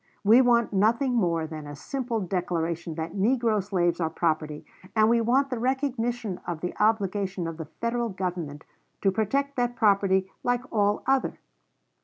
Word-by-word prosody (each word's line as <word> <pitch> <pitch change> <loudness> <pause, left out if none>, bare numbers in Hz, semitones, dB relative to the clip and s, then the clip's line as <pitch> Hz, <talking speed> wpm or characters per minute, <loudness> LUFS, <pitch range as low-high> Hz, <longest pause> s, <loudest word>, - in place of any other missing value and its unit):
"We 225 +5 +7
want 235 -3 +3
nothing 230 +7 +2
more 170 -8 +1
than 155 -2 -7
a 145 - -7
simple 240 - -3
declaration 170 -3 -2
that 165 0 -4
negro 220 0 +1
slaves 175 -3 0
are 160 - +1
property, 155 -2 -1 0.3
and 215 0 +5
we 235 0 +3
want 265 +4 +2
the 250 - -2
recognition 245 -5 -1
of 170 -2 -4
the 180 - -3
obligation 200 -4 +1
of 165 -1 -5
the 160 - -5
Federal 235 +8 -2
Government 175 -6 -4 0.4
to 195 - +4
protect 275 +8 -1
that 245 0 0
property 195 -3 +2
like 245 0 +1
all 205 -1 +2
other." 270 0 +1
205 Hz, 160 wpm, -26 LUFS, 175-240 Hz, 0.4 s, We